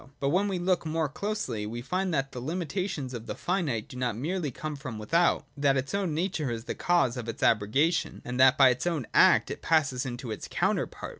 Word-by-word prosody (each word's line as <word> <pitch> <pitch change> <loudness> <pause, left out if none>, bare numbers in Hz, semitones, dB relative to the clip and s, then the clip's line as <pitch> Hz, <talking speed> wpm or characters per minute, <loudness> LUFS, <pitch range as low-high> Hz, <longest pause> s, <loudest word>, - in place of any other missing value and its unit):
But 140 - 0
when 190 +7 +2
we 195 -2 -1
look 180 0 +1
more 160 0 -1
closely, 140 - -3
we 120 +2 -5
find 185 +6 -1
that 135 -3 -1
the 125 - -6
hmitations 165 -2 -3
of 115 -1 -7
the - - -4
finite 155 - -1
do 140 - -11
not 125 -3 -1
merely 160 +4 -2
come 150 +4 -5
from 130 -5 -7
without; 165 +12 +2
that 140 -2 +2
its 130 +6 -3
own 190 -6 -1
nature 165 -4 -1
is 115 -1 -4
the - - -3
cause 170 -9 +1
of 120 -1 -5
its 115 - -5
abrogation, 135 - +2
and 125 +1 -4
that 130 +1 +6
by 135 -2 +7
its 125 +7 -1
own 160 -8 -1
act - - +5
it - - -6
passes 140 -6 +2
into 125 -2 -5
its 105 - -5
counterpart. - - -1
140 Hz, 220 wpm, -28 LUFS, 125-175 Hz, -, by